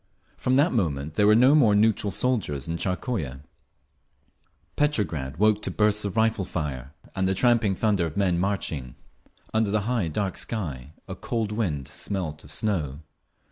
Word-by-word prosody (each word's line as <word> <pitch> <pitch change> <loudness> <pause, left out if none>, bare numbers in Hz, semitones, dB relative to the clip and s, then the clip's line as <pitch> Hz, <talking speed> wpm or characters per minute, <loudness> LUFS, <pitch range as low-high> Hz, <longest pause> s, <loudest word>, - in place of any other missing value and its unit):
From 130 - 0
that 145 +6 +3
moment 75 - -1
there 105 +3 +3
were 105 - +6
no 125 +5 +6
more 120 -9 +5
"neutral" 105 -1 +2
soldiers 100 - -1
in 85 - -2
Tsarskoye…. 90 - -3 1.3
Petrograd 85 - 0
woke 105 +1 +3
to - - -3
bursts 105 0 +1
of 100 -1 -4
rifle 110 -2 +2
fire, 75 -6 -5 0.2
and 95 0 +1
the 95 - +1
tramping 115 -2 +3
thunder 100 -6 +1
of 80 - -8
men 90 -4 +2
marching. 80 -10 -2 0.6
Under 110 -1 +2
the 105 +1 +1
high 115 -4 0
dark 95 +4 -2
sky 75 - -4
a - - -5
cold 115 -3 -3
wind 85 - -2
smelt 85 -6 -5
of 75 - -11
snow. 80 -7 -1
100 Hz, 160 wpm, -25 LUFS, 80-110 Hz, 1.3 s, were